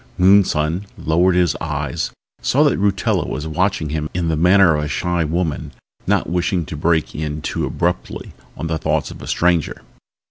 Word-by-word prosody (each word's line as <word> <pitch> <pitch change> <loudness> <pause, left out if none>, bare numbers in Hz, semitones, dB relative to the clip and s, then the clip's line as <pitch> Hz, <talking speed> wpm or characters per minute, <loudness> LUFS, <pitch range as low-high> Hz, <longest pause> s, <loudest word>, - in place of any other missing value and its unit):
Moonson 90 -2 +3
lowered 85 +3 +2
his 90 -1 +2
eyes, 75 +1 -2 0.3
saw 145 +4 +3
that 145 - +2
Rutella 100 -1 +1
was 75 - -4
watching 80 -1 0
him 75 0 -3
in 85 -2 0
the 80 - +1
manner 90 +2 +5
of 75 0 -1
a - - -3
shy 85 +2 -1
woman 80 -2 -2 0.3
not - - +1
wishing 90 0 0
to 75 - -7
break 80 +1 0
in 75 0 -4
too - - -2
abruptly 85 +1 -3 0.2
on - - -4
the 80 0 -2
thoughts - - -1
of - - -11
a - - -9
stranger. 85 -3 0
85 Hz, 175 wpm, -19 LUFS, 75-90 Hz, 0.3 s, manner